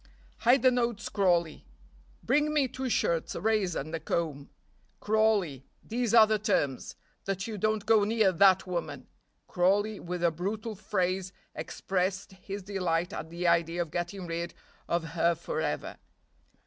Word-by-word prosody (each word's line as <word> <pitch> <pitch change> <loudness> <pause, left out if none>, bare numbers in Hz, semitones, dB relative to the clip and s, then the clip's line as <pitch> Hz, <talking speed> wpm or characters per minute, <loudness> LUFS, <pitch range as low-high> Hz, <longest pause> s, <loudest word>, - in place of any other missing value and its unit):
"Hide 245 +2 +4
the 255 - +6
notes, 235 -3 -1
Crawley. 175 -5 +1 0.6
Bring 300 +1 +2
me 295 -3 +2
two 260 +1 -4
shirts, 170 -7 0
a - - -3
razor, 210 -7 +1
and 155 +4 -9
a 165 - -2
comb. 155 -4 -3 0.5
Crawley, 210 - +1 0.2
these 235 0 -1
are 225 -2 +9
the 215 0 0
terms. 145 - -1 0.3
That 195 0 -2
you 225 - -5
don't 215 +1 0
go 220 -1 +5
near 215 -2 +3
that 190 +1 +5
woman 160 -7 -4 0.2
" - - -46
Crawley, 200 +4 +1
with 175 0 -5
a 170 - +4
brutal 205 +7 -4
phrase, 190 -2 -1 0.2
expressed 190 +1 -2
his 195 +1 -8
delight 180 -3 -1
at 160 - -6
the 170 +2 -5
idea 170 0 +2
of 160 - -14
getting 175 +2 -4
rid 170 0 -4 0.3
of 170 0 0
her 170 0 +2
forever. - - -3
190 Hz, 155 wpm, -29 LUFS, 170-215 Hz, 0.6 s, are